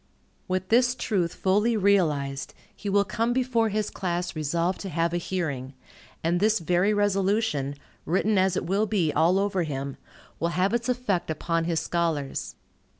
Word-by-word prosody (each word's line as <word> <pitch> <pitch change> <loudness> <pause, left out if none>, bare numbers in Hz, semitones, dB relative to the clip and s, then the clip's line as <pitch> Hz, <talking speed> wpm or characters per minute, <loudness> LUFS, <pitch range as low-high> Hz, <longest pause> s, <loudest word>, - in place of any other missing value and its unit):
With 185 0 -2
this 245 +2 +4
truth 190 -9 -1
fully 210 +5 +2
realized, 150 -9 +1 0.2
he 205 - -5
will 200 +1 +4
come 230 +4 0
before 245 -3 +1
his 215 0 -1
class 175 -2 -3
resolved 170 +4 -1
to 195 - -5
have 165 +1 0
a - - +1
hearing; 145 -8 -3 0.5
and 170 +2 +1
this 215 +3 +3
very 180 +4 +2
resolution, 195 -8 +1 0.3
written 195 +4 +2
as 190 -1 +2
it - - -2
will 200 +5 +1
be 180 -8 +1
all 165 +5 +3
over 195 -2 +1
him, 140 -4 -4 0.4
will 170 - +1
have 190 +4 +2
its 235 +1 0
effect 240 -10 -1
upon 165 +1 -1
his 165 -1 0
scholars. 160 -5 -2
185 Hz, 160 wpm, -26 LUFS, 165-205 Hz, 0.5 s, this